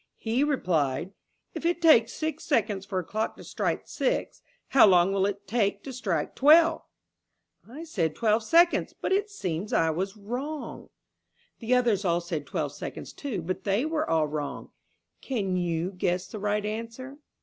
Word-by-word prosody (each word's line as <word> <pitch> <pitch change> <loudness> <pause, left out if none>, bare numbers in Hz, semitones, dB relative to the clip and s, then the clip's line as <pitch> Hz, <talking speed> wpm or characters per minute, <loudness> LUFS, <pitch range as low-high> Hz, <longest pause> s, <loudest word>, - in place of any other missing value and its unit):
He 235 +5 0
replied, 175 - 0 0.4
'If - - -6
it 345 +1 +1
takes 275 -9 +5
six 315 0 -4
seconds 205 -8 0
for 190 - -3
a 185 - 0
clock 215 +6 -3
to - - -11
strike - - -2
six, - - -2 0.3
how 265 -5 +7
long 185 0 +4
will 195 0 +2
it 200 0 -5
take 205 -1 0
to 270 - -7
strike 190 -11 -2
twelve?' 320 +3 +5 0.9
I 290 +7 -8
said 170 - -1
twelve 220 -1 +2
seconds, 340 +9 +3
but - - -2
it 405 +2 +1
seems 185 - -4
I 160 0 +3
was 190 +6 -3
wrong." 260 +9 -6 0.7
The 240 +2 +1
others 235 -5 +2
all 170 -2 +2
said 165 -4 -5
twelve - - -2
seconds - - -7
too, 230 - -4
but 185 +3 -4
they 205 +7 +1
were 315 0 -1
all 160 -1 +3
wrong. 150 -1 -5 0.5
Can 200 -8 -2
you 175 0 -1
guess 180 -1 -1
the 215 - -8
right 210 +1 -1
answer? 230 +6 -6
210 Hz, 170 wpm, -27 LUFS, 180-270 Hz, 0.9 s, how